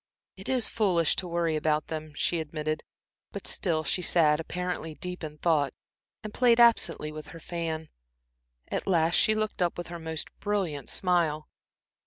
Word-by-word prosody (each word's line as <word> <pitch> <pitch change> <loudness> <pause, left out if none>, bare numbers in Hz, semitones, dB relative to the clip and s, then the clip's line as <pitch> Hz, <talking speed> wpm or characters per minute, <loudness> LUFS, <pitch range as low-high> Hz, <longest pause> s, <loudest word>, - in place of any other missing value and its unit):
"It 195 - -7
is 255 -3 +3
foolish 180 -8 +2
to 185 - -2
worry 170 -2 0
about 155 0 +1
them," 155 -1 -6
she 170 +2 +1
admitted, 155 0 -3 0.5
but - - -7
still 160 -4 +2
she 180 - 0
sat 155 -3 +4
apparently 175 -1 -4
deep 180 +1 -5
in 150 -1 -6
thought 150 -4 +1 0.5
and 215 -1 -6
played 240 -2 +4
absently 230 -9 +4
with 155 -1 -8
her 165 - -10
fan. 160 -1 -4 0.8
At - - -3
last 170 -3 +3
she 215 - +4
looked 215 -2 -2
up 175 -1 +1
with 175 -1 -5
her 170 0 -6
most 160 -1 -5
brilliant 190 -9 -2
smile. 165 -5 +1
165 Hz, 165 wpm, -28 LUFS, 155-180 Hz, 0.8 s, sat